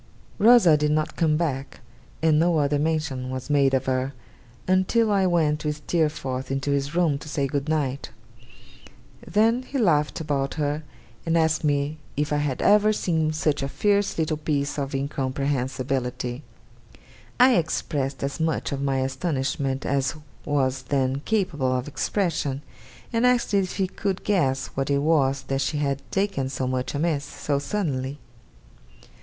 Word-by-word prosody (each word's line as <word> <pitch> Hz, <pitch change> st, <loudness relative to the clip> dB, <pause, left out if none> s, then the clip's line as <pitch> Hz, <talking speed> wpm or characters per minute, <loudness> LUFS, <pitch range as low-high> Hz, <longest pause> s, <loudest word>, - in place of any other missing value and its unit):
Rosa 215 Hz, -8 st, +7 dB
did 150 Hz, 0 st, +1 dB
not 155 Hz, 0 st, 0 dB
come 155 Hz, -2 st, +2 dB
back; 140 Hz, -5 st, -3 dB, 0.4 s
and 155 Hz, -2 st, +4 dB
no 170 Hz, 0 st, +3 dB
other 145 Hz, -1 st, +1 dB
mention 150 Hz, -5 st, -1 dB
was 130 Hz, +2 st, -5 dB
made 140 Hz, -2 st, +4 dB
of 130 Hz, -, 0 dB
her, 130 Hz, +1 st, -1 dB, 0.5 s
until 190 Hz, +5 st, +3 dB
I 195 Hz, -2 st, +3 dB
went 155 Hz, -4 st, +1 dB
with 150 Hz, -1 st, -1 dB
Steerforth 150 Hz, -6 st, -1 dB
into 135 Hz, +1 st, -1 dB
his 140 Hz, +2 st, -1 dB
room 165 Hz, -5 st, +2 dB
to 150 Hz, -, -10 dB
say 140 Hz, -2 st, 0 dB
Good 140 Hz, +2 st, -2 dB
night. 140 Hz, -3 st, -1 dB, 1.2 s
Then 225 Hz, +5 st, +3 dB
he 275 Hz, +2 st, -5 dB
laughed 155 Hz, -, +2 dB
about 140 Hz, -3 st, -1 dB
her, 150 Hz, 0 st, -1 dB, 0.4 s
and 165 Hz, 0 st, +1 dB
asked 160 Hz, -1 st, +2 dB
me 145 Hz, +1 st, 0 dB, 0.2 s
if 150 Hz, +1 st, 0 dB
I -, -, +2 dB
had 145 Hz, -3 st, -1 dB
ever 210 Hz, +1 st, +5 dB
seen 160 Hz, -6 st, 0 dB
such 155 Hz, -2 st, 0 dB
a 135 Hz, -, -1 dB
fierce 205 Hz, +6 st, +1 dB
little 155 Hz, -1 st, 0 dB
piece 145 Hz, -1 st, -1 dB
of 140 Hz, 0 st, -3 dB
incomprehensibility. 130 Hz, -2 st, -2 dB, 1.0 s
I 255 Hz, +1 st, +7 dB
expressed 140 Hz, -4 st, -2 dB
as 140 Hz, +4 st, -3 dB
much 160 Hz, -1 st, -1 dB
of 140 Hz, -1 st, -3 dB
my 135 Hz, -1 st, 0 dB
astonishment 135 Hz, -1 st, -2 dB
as 135 Hz, +2 st, 0 dB, 0.3 s
was 135 Hz, -3 st, 0 dB
then 135 Hz, -1 st, +1 dB
capable 175 Hz, -12 st, 0 dB
of 125 Hz, -, -4 dB
expression, 150 Hz, -4 st, -1 dB, 0.5 s
and 230 Hz, +1 st, +1 dB
asked 250 Hz, -3 st, +2 dB
if 195 Hz, -2 st, +1 dB
he 195 Hz, -, +2 dB
could 190 Hz, 0 st, -3 dB
guess 135 Hz, -10 st, +1 dB
what 135 Hz, 0 st, -2 dB
it 140 Hz, 0 st, +1 dB
was 140 Hz, -4 st, +2 dB
that 135 Hz, 0 st, -2 dB
she 150 Hz, -, -1 dB
had 140 Hz, -2 st, -1 dB
taken 190 Hz, -9 st, -1 dB
so 130 Hz, -1 st, -3 dB
much 130 Hz, +2 st, -2 dB
amiss, 150 Hz, -1 st, 0 dB
so 145 Hz, 0 st, -2 dB
suddenly. 140 Hz, -6 st, -2 dB
145 Hz, 155 wpm, -25 LUFS, 135-165 Hz, 1.2 s, Rosa